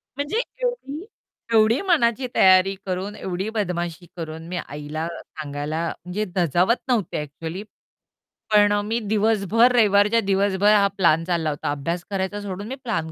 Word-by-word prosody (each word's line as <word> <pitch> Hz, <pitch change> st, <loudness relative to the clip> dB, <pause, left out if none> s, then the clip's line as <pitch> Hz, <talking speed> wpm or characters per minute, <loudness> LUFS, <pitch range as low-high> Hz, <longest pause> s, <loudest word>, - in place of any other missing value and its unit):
म्हणजे 290 Hz, +11 st, -1 dB, 0.2 s
एवढी 405 Hz, -, -3 dB, 0.5 s
एवढी 220 Hz, +3 st, +4 dB
मनाची 260 Hz, -, +2 dB
तयारी 190 Hz, +1 st, +6 dB
करून, 190 Hz, +3 st, -3 dB
एवढी 190 Hz, +3 st, -4 dB
बदमाशी 175 Hz, -3 st, -2 dB
करून, 160 Hz, 0 st, -6 dB
मी 180 Hz, +1 st, -4 dB
आईला 150 Hz, +3 st, -5 dB
सांगायला 150 Hz, +2 st, -5 dB, 0.2 s
म्हणजे 195 Hz, +4 st, -2 dB
धजावत 180 Hz, -, +2 dB
नव्हते 230 Hz, -11 st, 0 dB
ॲक्चुअली, 160 Hz, +6 st, -7 dB, 0.9 s
पण 205 Hz, 0 st, +6 dB
अ, 205 Hz, -, +1 dB
मी 225 Hz, +3 st, -1 dB
दिवसभर 220 Hz, +2 st, +3 dB
रविवारच्या 210 Hz, 0 st, +4 dB
दिवसभर 200 Hz, +1 st, +3 dB
हा 200 Hz, -1 st, +5 dB
प्लॅन 165 Hz, -3 st, +3 dB
चालला 170 Hz, -3 st, 0 dB
होता 145 Hz, 0 st, -3 dB
अभ्यास 165 Hz, +5 st, -3 dB
करायचा 195 Hz, +1 st, -2 dB
सोडून 200 Hz, +1 st, -6 dB
मी 260 Hz, -, -4 dB
प्लॅन 170 Hz, -10 st, -2 dB
195 Hz, 140 wpm, -23 LUFS, 170-215 Hz, 0.9 s, तयारी